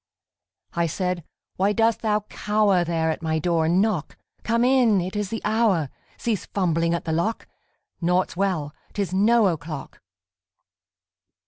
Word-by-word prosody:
I 170 0 +1
said, 180 +1 -2 0.4
_Why 200 +2 +2
dost 225 0 +2
thou 215 -1 +1
cower 210 -3 +1
There 165 -1 0
at 160 - -5
my 160 -1 0
door 165 0 +1
and 175 +3 +3
knock? 205 -8 -2 0.2
Come 230 +1 +1
in! 250 -6 +4
It 185 +3 -4
is 205 -2 -2
the 225 0 -4
hour! 210 - +2 0.3
Cease 220 -6 -2
fumbling 170 -3 +1
at 170 - -5
the 160 - -2
lock! 170 +8 -1 0.5
Naught's 180 +1 +1
well! 175 -6 -1 0.2
'Tis 195 -4 -2
no 220 +4 +4
o'clock! 155 -3 -6
185 Hz, 145 wpm, -24 LUFS, 165-215 Hz, 0.5 s, in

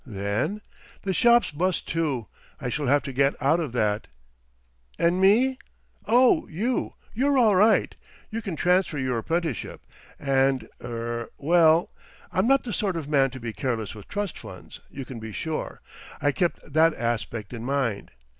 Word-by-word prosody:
"Then—?" 105 - -2 0.4
"The 195 - -1
shop's 235 +2 +4
bust 175 +4 -1
too. 150 -8 -1 0.3
I 125 - -3
shall 145 +2 -2
have 145 +2 +3
to 135 - -6
get 140 +2 +2
out 150 +5 +3
of 155 -7 -3
that." 105 -3 0 0.9
"And 170 +2 +2
me?" 250 +7 +4 0.5
"Oh, 255 +8 +4
you!—you're 250 - -1
all 220 -5 +5
right. 215 +4 +4 0.4
You 225 +1 -3
can 195 -7 -4
transfer 180 -2 +2
your 130 -3 -1
apprenticeship, 160 +1 -3 0.3
and—er—well, 135 +4 +1 0.4
I'm 185 +4 +1
not 275 +1 +4
the 235 - -5
sort 195 -1 -1
of 160 -4 -4
man 135 -3 +3
to 130 - -9
be 115 -2 -5
careless 115 -6 -3
with 105 -2 -12
trust 205 -3 -4
funds, - - -11
you 135 -1 -7
can 125 -2 -8
be 110 0 -7
sure. 160 +8 -4 0.4
I 145 - +2
kept 170 -3 -2
that 160 +1 +4
aspect 115 -2 -3
in 115 -2 -6
mind. 130 -6 -1
150 Hz, 155 wpm, -25 LUFS, 125-190 Hz, 0.9 s, all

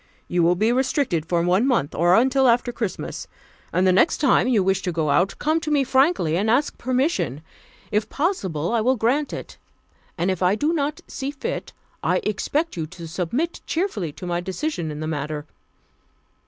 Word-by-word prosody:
You 175 0 +1
will 170 +1 +4
be 215 +5 +2
restricted 245 - 0
for 170 -1 +1
one 185 +8 +2
month, 235 - +1
or 175 +2 +4
until 265 +3 +4
after 245 +1 +3
Christmas. 225 -5 -4 0.4
And 185 - +2
the 185 - +5
next 190 - +3
time 280 -3 +3
you 225 -6 +3
wish 190 0 +1
to 180 - -2
go 160 -3 0
out, 180 +7 +2
come 315 +2 +1
to 320 - -4
me 290 -2 +3
frankly 265 - +2
and 210 +4 0
ask 265 +6 +2
permission. 255 - 0 0.5
If 210 +1 0
possible, 195 - -1
I 230 - +2
will 255 +4 +3
grant 260 +6 +1
it; - - -8 0.6
and 180 +2 +1
if 185 - -4
I 185 +2 +3
do 300 +8 0
not 300 -1 -1
see 270 0 -4
fit, 300 - -5 0.3
I - - +1
shall - - -1
expect 300 - -2
you 160 -3 -3
to 170 0 -9
submit 195 - -2
cheerfully 315 - -1
to 180 - -9
my 175 0 -1
decision 190 - -3
in 150 0 -6
the - - -3
matter. 150 -1 -3
215 Hz, 195 wpm, -23 LUFS, 175-275 Hz, 0.6 s, the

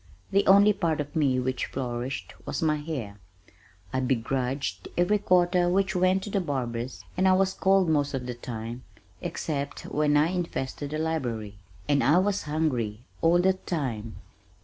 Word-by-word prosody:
The 200 +1 +3
only 200 +2 +7
part 165 -6 0
of 145 0 -4
me 135 -5 +2
which 130 0 -1
flourished 125 0 -4
was - - -3
my 155 -1 +2
hair. 135 -10 -5 0.7
I 130 - +1
begrudged 130 -4 -1
every 200 +4 +3
quarter 180 -2 +3
which 190 +1 +1
went 185 +1 +3
to 205 - -6
the 200 - +1
barbers 125 -5 -3
and 185 +1 +3
I 190 - +6
was 190 0 +2
cold 190 -1 +3
most 145 -3 +1
of 125 -2 -4
the 125 - -3
time 120 0 -6 0.4
(except 140 -3 -3
when 150 0 +2
I 150 +3 +4
infested 160 -6 -3
the 155 - -3
library) 120 -11 -3 0.3
and 140 -3 +3
I 150 +7 +5
was 200 +2 +2
hungry 125 -9 -1 0.2
all 170 +1 +4
the 190 +1 +4
time. 130 - -4
150 Hz, 165 wpm, -27 LUFS, 125-180 Hz, 0.7 s, only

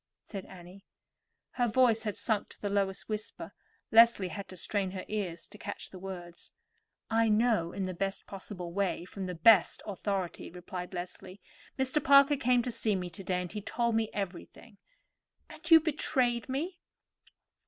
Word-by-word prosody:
said 195 -3 -7
Annie. 185 +2 -13 0.7
Her 245 -1 +1
voice 230 -1 +4
had 210 - -2
sunk 215 -3 -1
to - - -14
the 205 - -3
lowest 195 -1 -1
whisper. 215 -1 -5 0.4
Leslie 225 -4 +6
had 200 +2 -6
to 185 - -10
strain 195 +1 -1
her 185 0 -6
ears 190 -6 -4
to 210 - -14
catch 205 - -6
the 185 - -9
words. 175 -2 -9 0.6
"I 225 0 +3
know 215 -6 +2
in 195 - -3
the 185 0 -3
best 195 +2 -3
possible 185 -3 -7
way, 200 -1 0
and 175 - -10
from 195 -2 -5
the 180 - -4
best 185 +2 +5
authority," 195 -2 -3
replied 180 +1 -7
Leslie. 185 +2 -7 0.4
"Mr. 265 +2 0
Parker 280 +1 +7
came 250 -2 +2
to 245 - -3
see 225 -2 0
me 180 -2 -4
to 180 +3 -8
day, 180 -1 -1
and 180 - -7
he 210 - -5
told 235 +3 -1
me 220 -1 +1
everything." 200 +2 -7 0.7
"And - - -9
you 325 -1 +10
betrayed 265 -6 0
me?" 330 +7 -3
200 Hz, 175 wpm, -31 LUFS, 185-230 Hz, 0.7 s, you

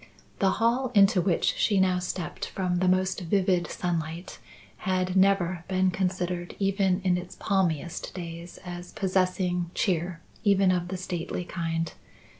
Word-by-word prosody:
The 195 - +4
hall 240 +3 +1
into 195 -2 +6
which 175 -1 +2
she 205 -3 +3
now 185 -1 +3
stepped 180 -1 -4
from 180 -2 -1
the 185 - +2
most 185 0 +2
vivid 180 0 +1
sunlight 170 0 -3 0.4
had 185 0 -1
never 190 -3 +3
been 185 0 +2
considered 180 -1 -2
even 195 -1 +1
in 180 -1 +2
its 180 0 -9
palmiest 175 -5 -1
days 170 -1 -7
as 175 0 -7
possessing 185 -2 0
cheer 175 -2 0 0.2
even 195 -3 +4
of 175 -1 0
the 185 +1 -4
stately 180 -1 -4
kind. 165 -2 -2
180 Hz, 140 wpm, -27 LUFS, 175-190 Hz, 0.4 s, into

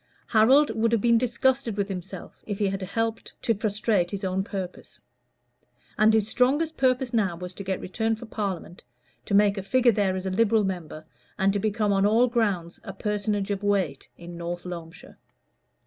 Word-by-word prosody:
Harold 260 +7 +5
would 225 +1 +1
have 230 - +3
been 235 0 +4
disgusted 250 -1 0
with 200 -1 0
himself 185 -1 -8
if 205 -2 -3
he 205 - 0
had 195 0 -2
helped 225 +4 -3
to 230 - +1
frustrate 210 -3 0
his 200 +1 -5
own 190 0 0
purpose. 190 -3 -7 1.0
And 215 0 +5
his 220 -2 +2
strongest 290 +8 +1
purpose 255 -1 +1
now 200 -7 +1
was 180 +1 -8
to 200 - -8
get 190 -1 -2
returned 225 +4 -1
for 240 - -9
Parliament, 195 -5 -5 0.4
to 200 - 0
make 200 0 +4
a - - -3
figure 240 +6 +3
there 200 -3 +1
as 185 0 -4
a 190 - -1
Liberal 220 +2 +3
member, 170 -5 -5 0.3
and 195 +1 +2
to 205 - 0
become 210 0 0
on 195 0 +2
all 225 +4 +4
grounds 205 -8 -1
a 195 - -7
personage 205 0 -2
of 200 -1 -2
weight 190 -9 -1
in 170 0 -10
North 175 +1 -5
Loamshire. 170 -1 -9
205 Hz, 185 wpm, -26 LUFS, 190-225 Hz, 1.0 s, Harold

